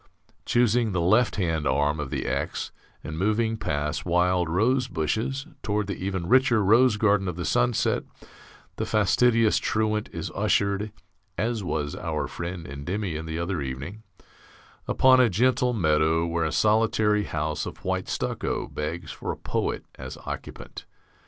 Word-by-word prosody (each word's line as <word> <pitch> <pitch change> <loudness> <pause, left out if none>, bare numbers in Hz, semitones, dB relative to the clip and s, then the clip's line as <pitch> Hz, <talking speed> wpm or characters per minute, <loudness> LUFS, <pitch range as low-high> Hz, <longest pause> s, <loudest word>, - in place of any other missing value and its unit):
Choosing 120 -2 +2
the 90 - 0
left 110 +8 +3
hand 80 -7 0
arm 75 +3 +1
of 75 -3 -3
the - - -3
X, - - -2 0.3
and 80 +1 -5
moving 110 +3 +1
past 75 -6 -2
wild 90 0 +2
rose 125 +9 +2
bushes 110 - -2 0.2
toward 105 0 -1
the 100 -1 -4
even 95 -3 -2
richer 125 -2 +4
rose 115 +3 +5
garden 100 -2 +2
of 90 - -3
the 90 -1 -4
sunset, 60 -5 +1 0.8
the - - -1
fastidious 110 +2 +3
truant 110 -1 0
is - - -5
ushered 100 +1 +1 0.5
(as 110 0 -1
was 75 -5 -2
our - - -2
friend 85 -1 -6
Endymion 80 +4 -4
the 80 0 -3
other 85 -1 -2
evening) 70 +10 -6 0.9
upon 130 0 +5
a 125 -2 +5
gentle 125 +5 +2
meadow 80 -5 +2
where 85 0 -1
a 80 - -1
solitary 105 0 +2
house 75 0 -2
of - - -10
white - - -1
stucco - - -2
begs 80 +2 -5
for - - -4
a - - -6
poet - - -2
as 65 0 -7
occupant. - - -7
95 Hz, 150 wpm, -26 LUFS, 80-110 Hz, 0.9 s, rose